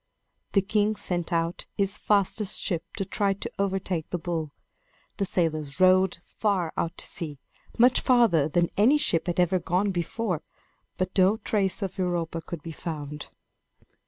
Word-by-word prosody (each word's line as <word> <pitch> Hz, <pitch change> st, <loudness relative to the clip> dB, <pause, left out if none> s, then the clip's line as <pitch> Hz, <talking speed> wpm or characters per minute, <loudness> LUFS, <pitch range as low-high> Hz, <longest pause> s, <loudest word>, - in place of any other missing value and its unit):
The 195 Hz, -, +4 dB
king 210 Hz, +1 st, +1 dB
sent 175 Hz, -3 st, -3 dB
out 165 Hz, 0 st, -1 dB
his 200 Hz, 0 st, +1 dB
fastest 205 Hz, 0 st, +1 dB
ship 170 Hz, -2 st, -1 dB
to 195 Hz, -, -1 dB
try 200 Hz, +1 st, +1 dB
to 235 Hz, +4 st, -6 dB
overtake 190 Hz, -4 st, -1 dB
the 180 Hz, -, -1 dB
bull. 165 Hz, -3 st, -3 dB, 0.7 s
The 195 Hz, -, -1 dB
sailors 155 Hz, -4 st, -1 dB
rowed 185 Hz, -1 st, +5 dB
far 190 Hz, -6 st, -1 dB
out 170 Hz, -, -2 dB
to -, -, -5 dB
sea, 150 Hz, -4 st, -4 dB, 0.4 s
much 245 Hz, +2 st, +5 dB
farther 230 Hz, -, +4 dB
than 175 Hz, +2 st, +1 dB
any 240 Hz, +9 st, +5 dB
ship 170 Hz, -, +1 dB
had 175 Hz, 0 st, -1 dB
ever 180 Hz, +1 st, +3 dB
gone 180 Hz, +4 st, 0 dB
before; 180 Hz, 0 st, -2 dB, 0.6 s
but 185 Hz, 0 st, -2 dB
no 195 Hz, +3 st, +4 dB
trace 200 Hz, -2 st, 0 dB
of 190 Hz, 0 st, -5 dB
Europa 170 Hz, -2 st, -1 dB
could 165 Hz, -2 st, -7 dB
be 165 Hz, -, -6 dB
found. 150 Hz, -3 st, -6 dB
185 Hz, 160 wpm, -27 LUFS, 165-200 Hz, 0.7 s, rowed